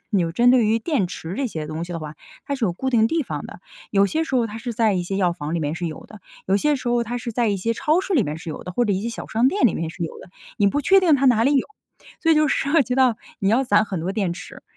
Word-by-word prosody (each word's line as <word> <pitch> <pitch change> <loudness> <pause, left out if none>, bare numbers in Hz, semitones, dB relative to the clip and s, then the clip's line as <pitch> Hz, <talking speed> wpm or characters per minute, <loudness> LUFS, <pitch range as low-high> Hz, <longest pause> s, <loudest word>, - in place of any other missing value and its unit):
有 180 -6 +1
针 240 +7 +4
对 245 -4 +4
于 225 +2 +2
电 245 - 0
池 175 -1 -6
这 275 +5 -1
些 155 -7 -5
东 155 +2 -4
西 175 - -8
的 170 - -3
话， 155 0 -7 0.3
它 285 - -1
是 260 -4 -1
有 185 - +1
固 265 +10 -3
定 225 -3 +4
地 325 +3 0
方 - - -5
的。 - - -12 0.3
有 200 -1 +4
些 315 +9 -1
时 270 - -4
候 235 -2 +2
它 215 0 -8
是 240 +1 -5
在 225 -2 +2
一 180 -2 0
些 195 +2 -3
药 180 -3 +2
房 150 -2 -6
里 - - 0
面 150 0 -2
是 175 +1 -3
有 155 - -9
的， 215 - -13 0.3
有 195 +1 +3
些 300 +6 +2
时 255 - -9
候 240 0 +2
它 235 +1 -4
是 235 0 -5
在 235 0 +1
一 200 - 0
些 230 +5 -1
超 310 +8 +2
市 380 - -4
里 275 - +4
面 150 -3 -4
是 165 0 -7
有 - - -7
的， - - -7
或 240 +7 +1
者 210 - +1
一 185 - -1
些 230 - -2
小 230 - -7
商 230 +4 +2
店 370 -5 +3
里 - - 0
面 165 - -3
是 165 +2 -7
有 160 - -7
的。 - - -13 0.3
你 205 - +4
不 290 - 0
确 385 +7 +5
定 345 -5 +4
它 275 - -1
哪 235 -4 +4
里 280 +2 +3
有， 265 - +1 0.6
所 325 - +3
以 - - +6
就 305 - +4
涉 285 +2 +2
及 250 0 -3
到 255 -3 +3 0.2
你 195 - +1
要 240 +6 +3
攒 210 -3 +3
很 190 -5 -4
多 175 +4 -2
电 195 -5 -1
池， 175 - -10
225 Hz, 345 characters per minute, -22 LUFS, 180-260 Hz, 0.6 s, 以